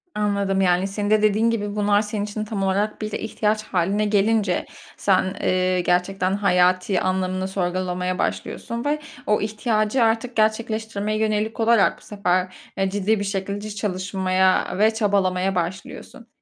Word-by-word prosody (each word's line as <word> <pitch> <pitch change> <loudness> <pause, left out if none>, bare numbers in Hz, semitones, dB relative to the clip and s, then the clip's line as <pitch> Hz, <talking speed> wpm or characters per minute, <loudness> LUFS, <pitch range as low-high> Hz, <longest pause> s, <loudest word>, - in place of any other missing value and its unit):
Anladım, 200 -2 0
yani, 180 +1 +2
senin 205 +1 -3
de 215 0 +4
dediğin 215 +2 +3
gibi, 205 -2 -2
bunlar 205 0 +3
senin 210 -1 -3
için 215 +1 -4
tam 205 -3 -3
olarak 200 +3 0
bir 215 0 -3
ihtiyaç 215 0 -1
hâline 195 +3 0
gelince, 205 -2 +1 0.3
sen, 190 -1 +2
eee, 185 0 +1
gerçekten 185 +2 0
hayati 185 -1 +2
anlamını 185 0 -1
sorgulamaya 180 -1 -2
başlıyorsun 235 +3 -3
ve 300 +1 0 0.3
o 210 - +2
ihtiyacı 215 +2 0
artık 230 +2 0
gerçekleştirmeye 215 -1 0
yönelik 220 +1 -1
olarak 225 -2 +3
bu - - -21
sefer, 185 -3 -1 0.2
eee, 195 0 +1
ciddi 205 +2 0
bir 205 - -2
şekilde 200 +1 -4
çalışmaya 190 -2 0
ve 220 +2 +4
çabalamaya 195 -3 +1
başlıyorsun. 185 +6 -5
200 Hz, 145 wpm, -22 LUFS, 185-215 Hz, 0.3 s, de